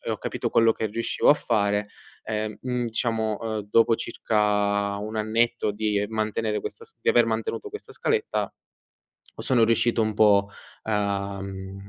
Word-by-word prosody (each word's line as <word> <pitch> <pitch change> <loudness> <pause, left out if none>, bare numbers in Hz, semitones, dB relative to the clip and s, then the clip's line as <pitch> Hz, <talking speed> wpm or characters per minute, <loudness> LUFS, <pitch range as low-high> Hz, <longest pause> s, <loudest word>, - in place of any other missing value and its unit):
e - - -5
ho - - -2
capito - - -3
quello 115 0 +5
che 110 - -2
riuscivo 115 +2 0
a - - +7
fare, 105 -5 0 0.3
ehm, 110 -1 -3
mhmm, 125 -1 -2
diciamo, 110 -2 -1
ehm, 110 -3 -4
dopo 115 +1 +5
circa 100 -1 0
un 110 +2 -5
annetto 110 0 +1
di 105 -1 0
mantenere 110 0 -1
questa 455 - -7
s 450 - -15
di - - -2
aver 460 - +5
mantenuto 445 -1 -2
questa 425 +1 -9
scaletta, 445 -1 -1 0.8
sono 125 -4 +2
riuscito 115 +1 +2
un 110 -1 0
po' 100 -2 +4 0.4
a 100 -2 -1
mhmm, 95 0 -8
110 Hz, 155 wpm, -25 LUFS, 105-115 Hz, 0.8 s, a